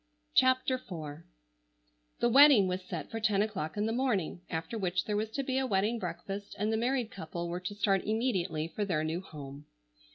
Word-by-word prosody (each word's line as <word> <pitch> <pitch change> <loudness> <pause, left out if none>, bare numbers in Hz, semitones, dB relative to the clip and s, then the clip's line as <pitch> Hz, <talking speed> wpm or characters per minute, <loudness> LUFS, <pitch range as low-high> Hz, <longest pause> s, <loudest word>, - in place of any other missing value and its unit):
CHAPTER 260 0 +4
IV 155 - -7 1.0
The 240 - +4
wedding 270 -6 +8
was 185 +1 -2
set 175 -3 -6
for 225 - -3
ten 210 -2 +2
o'clock 190 -6 -4
in 210 - +1
the 225 - 0
morning, 215 -10 0
after 165 +6 -3
which 185 -4 0
there 210 - -1
was 215 +1 -1
to 275 +5 -3
be 260 0 0
a 265 - 0
wedding 210 +3 +1
breakfast 195 +2 -5
and 210 +2 0
the - - +2
married 240 0 0
couple 170 -1 -5
were 175 +1 -3
to 185 +3 -5
start 195 -2 +2
immediately 190 -8 0
for 205 +5 -3
their 170 -6 0
new 160 +3 -2
home. 145 -5 -10
200 Hz, 195 wpm, -31 LUFS, 175-225 Hz, 1.0 s, wedding